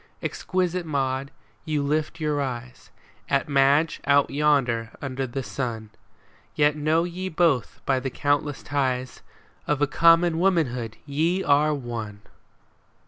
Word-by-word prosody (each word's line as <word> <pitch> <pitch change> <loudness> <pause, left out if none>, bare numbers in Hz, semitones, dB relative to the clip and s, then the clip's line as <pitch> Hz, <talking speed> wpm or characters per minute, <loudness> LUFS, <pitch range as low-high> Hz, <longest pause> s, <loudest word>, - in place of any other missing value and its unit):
Exquisite 180 -1 -1
Maud, 135 -3 -2 0.3
you 150 -3 -1
lift 155 +3 -1
your 150 -2 0
eyes 125 -2 -6 0.4
At 140 -1 +1
Madge 140 +3 +3
out 140 -1 +4
yonder 135 -6 +1
under 135 -1 -3
the 135 +2 -4
sun; 115 -5 -4 0.6
Yet 150 0 +3
know 155 +2 +1
ye 180 +2 -4
both 160 -7 +1
by 135 -1 +2
the 135 +1 -3
countless 145 +2 -1
ties 130 -3 -2 0.5
Of 150 -2 +1
a 145 - +4
common 165 +2 +4
womanhood 130 - 0
ye 165 +6 0
are 150 +1 +3
one 115 -6 -6
145 Hz, 130 wpm, -25 LUFS, 130-155 Hz, 0.6 s, out